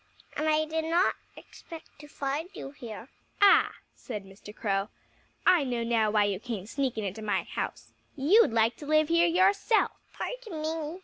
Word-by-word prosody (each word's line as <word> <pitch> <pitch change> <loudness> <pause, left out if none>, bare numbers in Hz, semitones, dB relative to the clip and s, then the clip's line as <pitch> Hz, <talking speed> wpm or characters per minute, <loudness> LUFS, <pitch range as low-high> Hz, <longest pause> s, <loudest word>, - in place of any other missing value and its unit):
And 310 +1 0
I 310 0 +2
did 320 +1 -2
not 340 +3 +2 0.2
expect 325 -3 -13
to 295 - -12
find 290 +3 -3
you 270 - -7
here." 235 -4 -9 0.3
"Ah!" 405 -1 +5 0.2
said 210 -5 -7
Mr. 195 +2 -12
Crow. 200 -1 -2 0.6
"I 350 -5 +5
know 245 -3 -2
now 230 -2 +2
why 210 0 +3
you 200 -2 -1
came 220 -5 -5
sneaking 235 -2 -2
into 195 +3 -5
my 215 -1 0
house. - - -6 0.2
You'd 320 - +4
like 225 +1 +2
to 290 - -10
live 310 0 +3
here 335 +1 +4
yourself." 390 +5 +3 0.3
"Pardon 450 -11 -5
me!" 320 +2 -3
285 Hz, 170 wpm, -28 LUFS, 220-325 Hz, 0.6 s, Ah